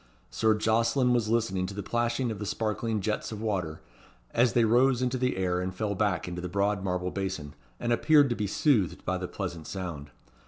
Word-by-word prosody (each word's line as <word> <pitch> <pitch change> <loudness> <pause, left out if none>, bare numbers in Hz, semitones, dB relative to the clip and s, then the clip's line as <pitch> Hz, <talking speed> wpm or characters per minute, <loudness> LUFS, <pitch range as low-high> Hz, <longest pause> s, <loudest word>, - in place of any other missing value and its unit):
Sir 110 -1 +2
Jocelyn 115 +4 +2
was 115 -3 +1
listening 105 -5 +1
to 100 - -7
the 100 - -4
plashing 120 +3 0
of 110 - -6
the 105 - -4
sparkling 110 +2 -1
jets 105 +3 -2
of 110 - -5
water, 95 -8 -2 0.5
as 120 0 +3
they 120 -2 +4
rose 125 +3 +3
into 125 0 0
the 125 -5 0
air, 90 -1 0
and 95 0 -4
fell 105 +1 -1
back 100 -4 0
into 90 0 -5
the 90 - -4
broad 100 +1 0
marble 90 -1 -1
basin, 95 -7 -4 0.3
and 120 0 0
appeared 145 +1 +4
to - - +1
be 105 -1 -2
soothed 105 - +1
by 95 0 -1
the 90 - -4
pleasant 85 -5 -5
sound. 85 -7 -5
105 Hz, 205 wpm, -28 LUFS, 90-120 Hz, 0.5 s, they